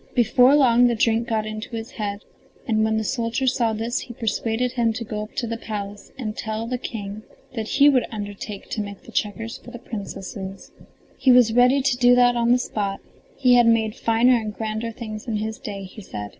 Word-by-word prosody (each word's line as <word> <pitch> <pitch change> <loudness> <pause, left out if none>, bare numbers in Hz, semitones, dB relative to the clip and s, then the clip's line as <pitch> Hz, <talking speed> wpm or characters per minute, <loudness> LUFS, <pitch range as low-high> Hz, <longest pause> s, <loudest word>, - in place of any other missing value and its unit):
Before 250 +3 +5
long 245 -4 +5
the 240 - +1
drink 230 +1 +1
got 220 -1 0
into 215 +2 -6
his 225 +1 -6
head, 205 -2 -4 0.5
and 220 -1 +2
when 220 0 +1
the 220 - 0
soldier 235 +2 -1
saw 240 -3 +2
this 225 +3 -2
he 240 - -9
persuaded 225 +2 -1
him 235 -3 +1
to 230 - -4
go 215 -1 -4
up 215 - -9
to 245 - -1
the 230 0 -3
palace 205 -2 -6
and 215 -5 -4
tell 220 +1 -3
the 250 +1 -3
King 205 -3 -6 0.3
that 225 -3 -4
he 280 +4 +5
would 265 -4 +4
undertake 205 -1 -7
to 215 - -1
make 200 -1 -8
the - - -13
checkers 225 +2 -3
for - - -13
the 245 - -8
Princesses. 195 -4 -7 0.5
He 260 - +5
was 245 -3 +6
ready 250 +3 +4
to 260 -2 +1
do 245 0 +6
that 245 0 +5
on 235 0 +2
the 245 - +6
spot; 200 -5 -3 0.4
he 255 -2 +4
had 240 -1 +6
made 220 -2 +3
finer 230 +2 +3
and 215 -2 -3
grander 220 +1 -3
things 215 0 -7
in 225 - -1
his 220 +1 -4
day, 200 -2 -6
he 190 +3 -10
said. 105 - -7
225 Hz, 215 wpm, -23 LUFS, 215-245 Hz, 0.5 s, was